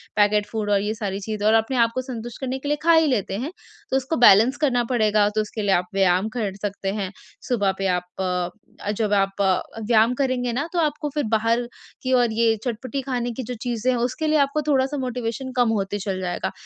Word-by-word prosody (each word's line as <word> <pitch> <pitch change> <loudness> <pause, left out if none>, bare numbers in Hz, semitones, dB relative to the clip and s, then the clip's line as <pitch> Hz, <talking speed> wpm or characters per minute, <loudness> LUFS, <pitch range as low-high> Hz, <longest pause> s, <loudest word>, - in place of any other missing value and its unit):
Packet 210 0 +3
food 215 -2 -3
और 200 -1 +3
ये 210 +1 -1
सारी 200 -3 -3
चीज़ें 210 0 -4
और 220 - +5
अपने 225 +4 +1
आप 230 -1 +4
को 255 - 0
संतुष्ट 240 -2 -7
करने 265 0 -2
के 285 - -7
लिए 295 - +1
खा 335 0 +5
ही 320 -1 +5
लेते 205 -7 -1
हैं, 265 +9 -4 0.4
तो 265 - +3
उसको 270 +4 -2
बैलेंस 240 +3 +6
करना 260 -5 +2
पड़ेगा, 215 -3 +3
तो 215 +1 0
उसके 215 +1 -5
लिए 205 -1 +1
आप 180 - 0
व्यायाम 190 +1 +2
कर 205 -5 -1
सकते 200 -1 -3
हैं। 190 -2 -3 0.4
सुबह 205 -6 +1
पे 195 - 0
आप 180 -1 0 0.2
अ, 180 +3 -4
जब 210 0 -1
आप 195 0 +1
अ, 190 -2 +2 0.3
व्यायाम 230 +1 +4
करेंगे 250 -2 0
ना 280 +6 -1
तो 350 - +1
आप 325 - +4
आपको 300 0 -2
फिर 295 - +1
बाहर 230 +2 +1 0.4
की 260 0 0
और 245 -2 +3
ये 225 0 +3
चटपटी 255 +3 -3
खाने 250 -2 -2
की 255 +3 -5
जो 250 - -5
चीज़ें 245 0 0
हैं, 250 - 0
उसके 250 +7 -1
लिए 305 0 +3
आपको 280 +2 +1
थोड़ा-सा 275 0 +2
मोटिवेशन 250 0 -3
कम 245 -2 +4
होते 200 +1 -3
चल 195 -1 -3
जाएगा। 175 -1 -2
230 Hz, 230 wpm, -23 LUFS, 205-255 Hz, 0.4 s, बैलेंस